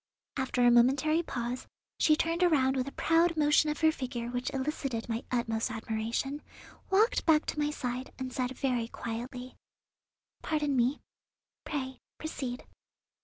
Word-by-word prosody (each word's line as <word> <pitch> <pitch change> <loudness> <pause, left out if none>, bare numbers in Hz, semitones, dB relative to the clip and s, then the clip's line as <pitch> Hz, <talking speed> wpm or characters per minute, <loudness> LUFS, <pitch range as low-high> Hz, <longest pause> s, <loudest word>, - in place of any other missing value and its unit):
After 260 -2 0
a 240 - +7
momentary 270 +7 +4
pause 245 -5 -4 0.3
she 305 - +5
turned 330 +2 0
around 275 -7 +4
with 260 0 -1
a - - -4
proud 330 +1 +3
motion 300 0 +4
of 300 - -3
her 315 0 +6
figure 250 -5 -4
which 245 +2 -2
elicited 270 -4 -2
my 230 0 -2
utmost 230 -2 0
admiration, 225 +5 -2 0.5
walked 430 +5 +3
back 310 -1 +5
to - - -3
my 295 0 +1
side, 255 -3 -4
and 260 -1 -5
said 255 0 -2
very 250 -4 0
quietly: 245 +3 -6 0.9
"Pardon 300 -3 0
me; 250 +3 +2 0.6
pray 265 -4 -4 0.2
proceed." 265 -5 -5
260 Hz, 145 wpm, -30 LUFS, 245-300 Hz, 0.9 s, a